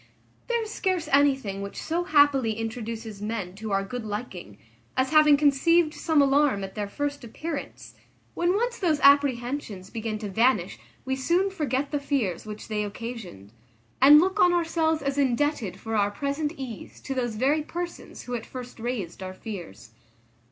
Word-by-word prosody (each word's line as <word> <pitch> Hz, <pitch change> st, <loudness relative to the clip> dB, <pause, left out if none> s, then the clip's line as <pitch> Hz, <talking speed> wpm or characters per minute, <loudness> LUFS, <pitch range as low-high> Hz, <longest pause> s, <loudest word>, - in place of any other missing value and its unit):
There 470 Hz, -1 st, 0 dB
is 435 Hz, -, -7 dB
scarce 370 Hz, -5 st, -1 dB
anything 270 Hz, -8 st, +2 dB
which 200 Hz, 0 st, -6 dB
so 345 Hz, +2 st, -2 dB
happily 285 Hz, -8 st, +4 dB
introduces 225 Hz, -1 st, -5 dB
men 210 Hz, -4 st, -3 dB
to 220 Hz, 0 st, -5 dB
our 195 Hz, 0 st, +1 dB
good 245 Hz, +4 st, -5 dB
liking, 205 Hz, -, -6 dB, 0.4 s
as 260 Hz, +2 st, +1 dB
having 305 Hz, -2 st, +6 dB
conceived 305 Hz, +3 st, +3 dB
some 315 Hz, -3 st, +2 dB
alarm 275 Hz, -6 st, +3 dB
at 190 Hz, 0 st, -6 dB
their 205 Hz, -1 st, -3 dB
first 285 Hz, +5 st, -3 dB
appearance; 295 Hz, +6 st, -6 dB, 0.4 s
when 345 Hz, +2 st, +1 dB
once 475 Hz, +2 st, -1 dB
those 320 Hz, -5 st, +1 dB
apprehensions 255 Hz, -7 st, +2 dB
begin 220 Hz, -1 st, -3 dB
to 210 Hz, -1 st, -5 dB
vanish 230 Hz, +7 st, +1 dB, 0.3 s
we 265 Hz, 0 st, 0 dB
soon 345 Hz, +9 st, +1 dB
forget 285 Hz, -6 st, -2 dB
the 290 Hz, -, 0 dB
fears 260 Hz, -, -2 dB
which 210 Hz, 0 st, -8 dB
they 210 Hz, -1 st, -1 dB
occasioned, 205 Hz, -, -7 dB, 0.5 s
and 290 Hz, +3 st, +9 dB
look 380 Hz, +4 st, +1 dB
on 355 Hz, -2 st, +5 dB
ourselves 325 Hz, -2 st, +1 dB
as 275 Hz, 0 st, -1 dB
indebted 250 Hz, -, 0 dB
for 225 Hz, +1 st, -4 dB
our 205 Hz, -1 st, +3 dB
present 280 Hz, +7 st, -2 dB
ease 255 Hz, -6 st, -8 dB
to 270 Hz, -, -4 dB
those 240 Hz, -4 st, -2 dB
very 275 Hz, +7 st, +2 dB
persons 345 Hz, +3 st, -6 dB
who 245 Hz, -, -6 dB
at 235 Hz, -2 st, -3 dB
first 250 Hz, -2 st, -9 dB
raised 220 Hz, -8 st, -4 dB
our 185 Hz, 0 st, -6 dB
fears. 175 Hz, -, -8 dB
260 Hz, 165 wpm, -26 LUFS, 215-300 Hz, 0.5 s, and